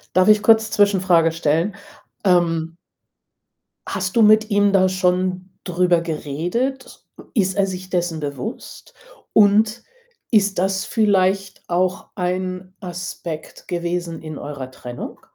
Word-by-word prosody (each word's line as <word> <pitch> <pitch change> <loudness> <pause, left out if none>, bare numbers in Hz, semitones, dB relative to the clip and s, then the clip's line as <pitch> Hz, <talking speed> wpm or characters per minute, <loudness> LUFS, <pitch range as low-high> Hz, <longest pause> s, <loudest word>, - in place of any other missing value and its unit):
Darf 185 +2 +4
ich 210 -1 +6
kurz 220 0 +4
Zwischenfrage 185 -5 +3
stellen? 165 +5 0 0.5
Ähm 165 -3 +2 1.1
hast 185 +1 -3
du 230 - +6
mit 215 +1 +5
ihm 205 0 +3
da 190 -1 +4
schon 185 0 0
drüber 180 -1 +2
geredet? 175 - -3 0.3
Ist 190 -4 +1
er 195 - +3
sich 185 -1 -6
dessen 175 -3 -1
bewusst? 150 - -7 0.4
Und 215 +2 +4 0.5
ist 205 -4 +2
das 195 +2 0
vielleicht 195 -3 +1
auch 185 +2 0
ein 185 0 -3
Aspekt 175 -2 -7
gewesen 175 -1 -3
in 155 -2 -7
eurer 140 -3 -7
Trennung? 125 -1 -8
185 Hz, 115 wpm, -21 LUFS, 170-200 Hz, 1.1 s, ich